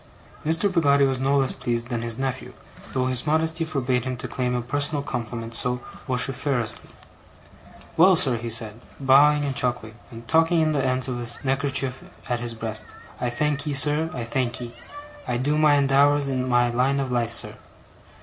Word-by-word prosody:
Mr. 165 +5 +1
Peggotty 140 -5 +3
was 135 -1 -1
no 135 +2 +1
less 135 -1 +2
pleased 115 0 -3
than 120 -2 -2
his 115 -1 -3
nephew, 130 -1 -4 0.4
though 130 -1 0
his 130 +2 +1
modesty 160 +2 +1
forbade 130 -6 -1
him 130 -1 -4
to - - -5
claim 125 -1 -2
a 120 - -1
personal 145 +3 -1
compliment 115 -3 -5
so 125 +2 -2 0.3
vociferously. 130 -2 -1 1.1
'Well, 185 +3 +6
sir,' 130 -7 +4
he 115 +1 -5
said, 115 0 +1 0.2
bowing 145 +2 +4
and 135 -2 -3
chuckling, 120 -3 -2
and 115 -1 -12
tucking 165 +1 +3
in 155 -1 +2
the 140 -3 0
ends 130 0 0
of 125 -2 -3
his 120 -1 -4
neckerchief 135 -1 -1 0.2
at 120 -1 -1
his 120 -1 -5
breast: 110 -1 -1 0.2
'I 125 - -1
thankee, 145 +3 -1
sir, 150 +3 +4
I 125 -5 -5
thankee! 120 0 -3 0.5
I 120 - -1
do 145 +4 0
my 150 -1 +4
endeavours 140 +1 +3
in 130 -1 -2
my 120 -1 +3
line 130 +3 +1
of 135 -2 -3
life, 120 -2 0
sir. - - +1
130 Hz, 180 wpm, -24 LUFS, 120-145 Hz, 1.1 s, Well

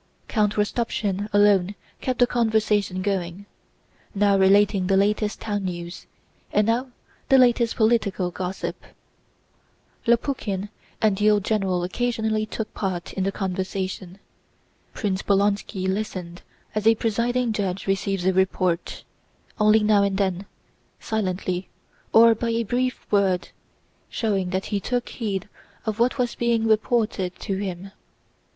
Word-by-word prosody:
Count 210 -2 +1
Rostopchín 210 -2 -1
alone 205 -1 +4 0.3
kept 255 -1 -1
the 245 - +5
conversation 215 -5 +1
going, 190 -1 -2 0.7
now 200 0 +3
relating 195 0 +4
the 195 0 +3
latest 210 +1 +1
town 205 -2 -3
news, 175 -1 -6 0.4
and 210 0 +3
now 240 +4 0 0.4
the 270 - +7
latest 240 -2 +4
political 215 -5 +1
gossip. 185 +1 -4 1.3
Lopukhín 230 -5 0 0.3
and 210 -2 +3
the 210 +1 +4
old 210 -2 +3
general 195 -5 0
occasionally 220 +2 -1
took 220 0 -5
part 185 -4 -3
in 190 - -1
the 195 - 0
conversation. 190 -1 -4 0.8
Prince 195 -3 -1
Bolkónski 200 -1 0
listened 185 -3 -4 0.3
as 215 0 0
a 225 - +6
presiding 235 +2 0
judge 195 -3 -2
receives 195 -1 -1
a 190 - +3
report, 185 -2 0 0.6
only 215 0 +5
now 210 -1 +4
and 200 -1 +1
then, 195 -1 -1 0.5
silently 185 -4 -2 0.4
or 230 +1 +7
by 230 +1 -3
a 230 0 0
brief 250 +4 -1
word, 195 -3 +2 0.6
showing 195 -5 -1
that 190 +1 -2
he 200 - +2
took 245 +4 -2
heed 205 -4 -3 0.4
of 220 -1 -2
what 245 +3 +2
was 245 -2 0
being 235 -1 +1
reported 215 -4 +1
to 195 -3 -2
him. 190 -1 -5
205 Hz, 130 wpm, -24 LUFS, 190-220 Hz, 1.3 s, the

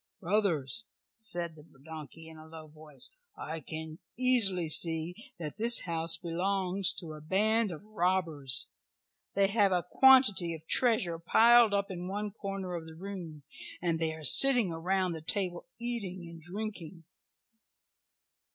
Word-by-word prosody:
"Brothers," 185 - 0 0.3
said 175 -6 -1
the 155 - -15 0.2
donkey 160 0 -10
in 160 - -13
a 155 - -14
low 160 -1 -11
voice, 155 - -7 0.2
"I 160 +1 -6
can 155 +2 -8 0.2
easily 225 -9 +3
see 165 +5 0
that 165 +2 -7
this 235 +2 +6
house 165 -1 0
belongs 185 +2 -1
to 160 -3 -8
a 155 - -11
band 215 +7 +1
of 170 +4 -9
robbers. 175 -9 0 0.6
They 200 0 +3
have 200 -2 +2
a 180 -1 0
quantity 215 -10 +4
of 160 0 -14
treasure 215 -7 +1
piled 230 +5 +4
up 200 -1 -2
in 180 -1 -6
one 205 +2 -4
corner 195 -3 -6
of 165 -2 -6
the 160 - -12
room, 170 -5 -9 0.4
and 170 -2 -2
they 160 -1 -1
are 160 - -12
sitting 245 - +6
around 180 +3 -1
the 160 -1 -7
table 180 +2 -2
eating 200 -7 -5
and 165 -1 -12
drinking." 180 -2 -8
180 Hz, 145 wpm, -30 LUFS, 160-205 Hz, 0.6 s, this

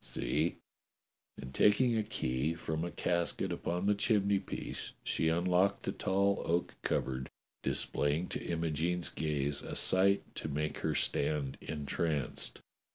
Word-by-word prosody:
See!" 80 +3 0 0.8
And 65 0 -8
taking 115 - +4
a 110 - +2
key 75 - -1
from 80 -1 -3
a 85 - -2
casket 85 0 0
upon 90 +2 -2
the 105 - +4
chimney 100 -1 +2
piece - - -5
she 80 - +2
unlocked 90 +4 +2
the - - -1
tall 100 +1 +1
oak 85 +1 0
cupboard, 65 0 -1 0.3
displaying 75 +5 0
to - - -4
Imogene's 85 +1 0
gaze 75 -2 -1
a - - -6
sight 100 +2 +4
to - - -3
make 75 +1 -2
her - - 0
stand 70 -2 0
entranced. 75 -1 -2
85 Hz, 135 wpm, -33 LUFS, 75-95 Hz, 0.8 s, taking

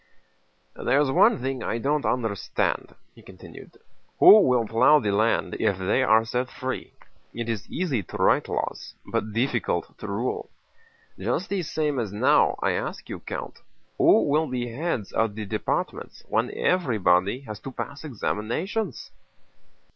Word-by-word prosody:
"There's 140 0 +1
one - - +5
thing 135 -1 -2
I 110 - -2
don't 145 +5 0
understand," 110 -6 -1 0.2
he - - -17
continued. - - -13 0.4
"Who 215 - +9
will 125 - +2
plow 120 +7 +5
the 105 -8 0
land 110 +3 +1
if 100 - +1
they 95 +7 +1
are 115 -3 +4
set 125 +2 -2
free? 130 0 -5 0.4
It 115 -1 -4
is 115 -3 -4
easy 155 - -1
to 85 - -8
write - - +2
laws, - - -4
but 110 - -2
difficult 120 +6 -1
to - - -7
rule.... - - -3 0.7
Just 190 - -2
the 200 -2 -1
same 150 -4 -1
as 110 -5 -3
now—I 105 - +2
ask - - -4
you, - - -5
Count—who - - -1
will 155 +2 +1
be 120 -2 -3
heads 140 - -3
of 110 -2 0
the 110 -1 -5
departments 100 - -3
when - - 0
everybody 110 - +2
has 105 -6 -8
to 135 - -8
pass 140 +3 -6
examinations?" 155 - -3
125 Hz, 145 wpm, -25 LUFS, 110-145 Hz, 0.7 s, Who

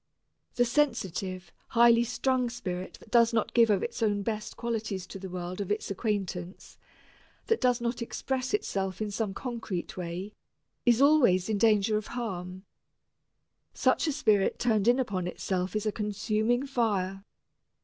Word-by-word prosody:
The 245 - +3
sensitive, 195 - -1 0.2
high 235 0 +5
strung 250 +1 0
spirit 185 -6 -5
that 215 - -18
does 235 -1 +5
not 225 - 0
give 230 -1 +5
of 200 -2 +2
its 235 - -4
own 205 -2 +1
best 215 0 -4
qualities 220 -5 -3
to 195 - -9
the 190 0 -7
world 180 +1 -5
of 200 - -4
its 210 -1 -2
acquaintance, 195 -3 -4 0.7
that 450 - +1
does 250 -2 +3
not 235 0 -2
express 260 +2 -3
itself 195 - -2
in 215 -1 -2
some 205 -1 -2
concrete 225 -8 -4
way, 180 +3 -5 0.5
is 240 +2 +5
always 240 -11 +4
in 210 -2 0
danger 215 -1 +3
of 215 - -5
harm. 185 -4 -5 1.1
Such - - +2
a - - +2
spirit 215 -9 +2
turned 220 -3 +1
in 245 +1 +5
upon 200 -9 -1
itself 180 +1 -2
is 215 0 -1
a 215 - +1
consuming 215 +4 0
fire. 200 -7 -1
215 Hz, 155 wpm, -29 LUFS, 190-235 Hz, 1.1 s, high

